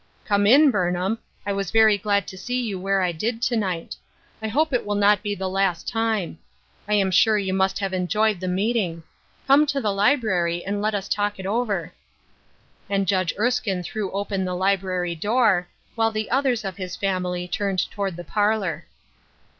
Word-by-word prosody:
" - - -35
Come 205 -1 +2
in, 280 +5 +7
Burnham. 185 +1 0 0.3
I 200 - -1
was 195 -2 -2
very 220 -1 +5
glad 200 -1 0
to - - -10
see 245 +6 -3
you 215 -6 -3
where 195 0 +1
I 180 - +1
did 225 +8 -3
to 245 - +1
night. 185 -6 -2 0.5
I 220 - -2
hope 295 +6 +1
it 245 - +1
will 205 0 -2
not 205 0 +4
be 205 -1 -2
the 190 -1 -3
last 185 -2 0
time. 220 -7 -1 0.5
I 210 - +2
am 195 -2 +2
sure 215 +4 +4
you 190 -2 -1
must 190 0 +1
have 195 -2 -3
enjoyed 205 +3 +1
the 185 - -4
meeting. 185 -3 -1 0.4
Come 285 +3 +5
to 280 -1 0
the 210 -6 0
library 195 -7 +1
and 205 +1 -2
let 215 0 0
us 200 -1 -3
talk 205 0 -1
it 190 - -7
over." 200 -5 -1 1.0
And 195 -1 0
Judge 185 -3 +1
Erskine 210 -5 0
threw 200 +3 -4
open 200 0 -2
the 180 -1 -2
library 185 -2 0
door, 205 0 +2 0.3
while 225 0 +2
the 215 -1 -4
others 255 -4 +1
of 190 -1 -5
his 185 -2 -5
family 180 -2 -2
turned 195 +1 -1
toward 195 -3 -3
the 175 - -7
parlor. 205 +1 -1
200 Hz, 190 wpm, -23 LUFS, 185-220 Hz, 1.0 s, in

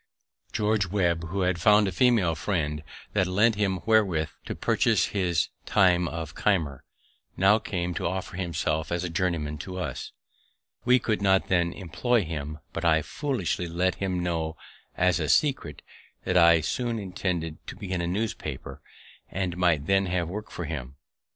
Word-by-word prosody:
George 105 -2 +1
Webb, 85 -3 0
who 95 +3 -2
had 90 -2 0
found 105 +1 +5
a - - -1
female 110 -4 +3
friend 75 -3 -2 0.3
that 95 -3 +2
lent 105 +5 +3
him 100 -3 0
wherewith 100 -9 +3 0.2
to - - -4
purchase - - +2
his 90 -5 +1 0.2
time 90 -3 +4
of 80 -2 -5
Keimer, 80 -10 0 0.5
now 100 +3 +5
came 90 -4 -3
to - - -2
offer 90 0 -4
himself 85 -3 -2
as 85 0 -1
a 90 - -3
journeyman 80 -4 -1
to 95 +4 -6
us. 90 - -4 0.7
We 125 +1 +6
could 110 -4 -1
not 95 -1 +3
then 85 -2 +2
employ 105 +6 0
him; 75 -2 -5 0.2
but - - -4
I 80 -2 +3
foolishly 115 - -2
let 90 +2 0
him 95 -2 0
know 80 -2 -2 0.4
as 90 -2 +3
a 75 -3 -1
secret 135 - +1 0.4
that 95 - -1
I 85 -2 +6
soon 120 +7 -1
intended 90 -5 -3
to - - -6
begin 95 -3 -3
a 85 - -1
newspaper, 95 -8 -4 0.5
and 90 -1 -2
might 85 -5 +2
then 95 +2 +2
have 90 -2 0
work 105 +5 -6
for 85 - -5
him. 70 -4 -5
90 Hz, 165 wpm, -27 LUFS, 80-100 Hz, 0.7 s, We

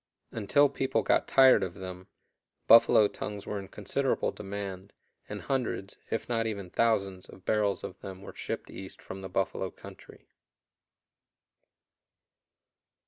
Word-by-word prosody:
Until 115 +7 +3
people 135 0 0
got - - +2
tired 130 -5 +7
of 90 -2 -3
them, 95 -1 -8 0.6
buffalo 110 -2 +7
tongues 105 0 -6
were 105 - -3
in 95 - -8
considerable 115 +7 -1
demand, 100 -1 -6 0.4
and - - -5
hundreds, 125 -7 -2
if 115 - -2
not 115 -2 0
even 100 -5 -5
thousands, 100 -5 +1
of 95 - -14
barrels 105 -2 +1
of - - -7
them 95 0 -9
were - - -9
shipped - - -5
east 95 0 -9
from 95 - -8
the 95 - -7
buffalo 95 0 -1
country. - - -14
100 Hz, 135 wpm, -29 LUFS, 95-115 Hz, 0.6 s, tired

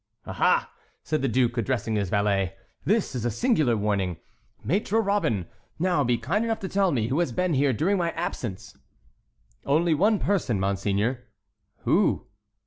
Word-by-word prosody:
"Aha!" - - +1 0.3
said 155 -1 -1
the 135 - +1
duke, 120 0 +1
addressing 115 -1 -1
his 100 -3 -1
valet, 100 -2 +1 0.3
"this 215 -4 +1
is 125 -3 -3
a 120 - +1
singular 145 - +2
warning, 100 -4 -1 0.5
Maître 210 +6 +1
Robin. 160 - +1 0.3
Now 175 -3 +2
be 120 -2 +1
kind 165 - -1
enough 225 -1 -1
to 190 - -3
tell 195 -1 +2
me 115 -4 0
who 135 +5 0
has 170 -7 +1
been 180 +6 0
here 140 0 +3
during 185 - +1
my 170 -1 +1
absence." 120 - -5 0.9
"Only 160 +4 +2
one 205 +8 +3
person, 180 - 0
monseigneur." 100 +5 0 0.6
"Who?" - - +2
135 Hz, 155 wpm, -26 LUFS, -, 0.9 s, here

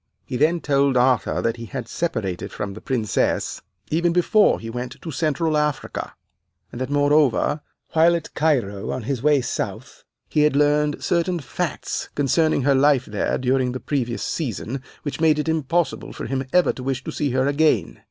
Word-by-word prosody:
He - - -5
then 160 +5 +2
told 140 -2 +2
Arthur 125 -1 +2
that 115 +1 0
he 115 0 -7
had - - -5
separated 90 -2 -3
from 100 -1 -4
the 110 - -10
Princess 110 -7 -1 0.3
even 170 +2 +2
before 190 +4 +4
he 115 - -8
went 125 +2 -5
to 165 - -6
Central 155 +2 0
Africa, 150 -2 -2 0.6
and 120 - -7
that, 130 - -2
moreover, 145 0 +2 0.3
while 165 +2 +5
at 165 - -5
Cairo 120 -11 0
on 130 - -3
his 130 0 -2
way 145 -1 +4
south, 125 - -5 0.2
he 150 - +1
had 150 -2 +3
learned 150 0 +2
certain 175 0 +1
facts 135 - -4
concerning 145 +1 +2
her 140 +1 +4
life 135 -1 +4
there 105 -1 -1
during 130 0 +1
the 130 - -4
previous 125 -5 -2
season, 130 - -3 0.2
which 145 0 -4
made 155 -2 +4
it 150 - -2
impossible 160 0 -1
for - - -6
him 135 0 -2
to - - -23
ever 180 -1 +4
wish 130 0 -2
to - - -5
see 145 - -1
her 130 +1 +1
again. 145 - +1
140 Hz, 180 wpm, -22 LUFS, 125-155 Hz, 0.6 s, while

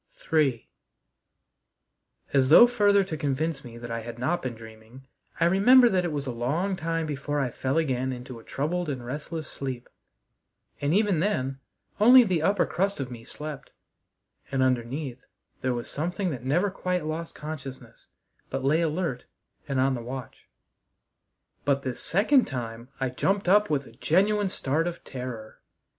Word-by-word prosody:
III 135 -7 +2 1.7
As 135 -2 +3
though 165 +10 +10
further 205 -5 +3
to 180 -4 -5
convince 150 0 -1
me 120 -1 -10
that 120 0 -7
I 115 - -2
had 115 +1 -8
not 160 +9 0
been 125 -3 -4
dreaming, 110 +3 -13 0.3
I 165 - +4
remember 240 +8 +6
that 185 -3 +1
it 175 - -2
was 145 -2 -3
a 130 - -2
long 150 +12 -1
time 165 -1 -2
before 145 0 -2
I 130 -3 0
fell 135 +5 -1
again 130 -5 0
into 125 -1 -7
a - - -15
troubled 170 +4 -2
and 130 -4 -4
restless 150 +4 -5
sleep; 130 -3 -5 0.9
and 145 +1 +1
even 200 -2 +3
then 135 -8 -1 0.4
only 245 +4 +9
the 185 -7 0
upper 195 +3 +2
crust 195 0 -1
of 130 -2 -4
me 115 -2 -8
slept, 150 +2 -8 0.8
and 135 -1 +2
underneath 130 +1 -1 0.4
there 130 -1 0
was 120 - -5
something 175 +4 -2
that 125 -4 -6
never 175 +10 +1
quite 180 -3 -2
lost 160 +2 -4
consciousness, 135 -6 -8 0.4
but 135 - -3
lay 155 +4 +3
alert 160 -5 -1 0.4
and 135 -2 -1
on 135 +1 +3
the 120 - -3
watch. 125 +1 -8 1.2
But 140 -1 +1
this 130 -2 -4
second 230 - +3
time 120 -2 -6
I 130 -1 0
jumped 195 +10 0
up 210 +3 +5
with 140 -3 0
a - - -14
genuine 195 - +2
start 160 -2 -1
of 175 0 -5
terror. 125 -4 -7
145 Hz, 165 wpm, -27 LUFS, 130-175 Hz, 1.7 s, though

